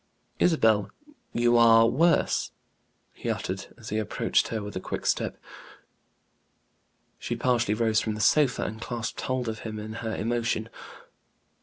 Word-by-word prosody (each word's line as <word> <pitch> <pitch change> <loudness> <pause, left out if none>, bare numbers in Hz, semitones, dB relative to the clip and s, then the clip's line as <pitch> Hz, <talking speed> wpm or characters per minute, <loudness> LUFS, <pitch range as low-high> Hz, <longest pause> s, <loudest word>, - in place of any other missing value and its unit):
"Isabel, 110 - +3 0.4
you 120 0 +3
are 115 -1 +7
worse!" 165 +9 +2 0.6
he - - -5
uttered, - - -3
as - - -10
he 110 - -1
approached 110 - 0
her 110 -2 -3
with 105 -1 -7
a - - -2
quick - - -5
step. - - 0 1.8
She 120 - -3
partially 120 -3 +1
rose 110 -1 +2
from 110 -1 -2
the - - -7
sofa, 140 0 +3
and 110 +1 -5
clasped 115 -3 -4
hold 130 -2 -2
of 110 -1 -4
him 110 -1 -6
in 110 +1 -6
her 110 -1 -3
emotion. 115 0 -1
115 Hz, 145 wpm, -27 LUFS, 110-120 Hz, 1.8 s, are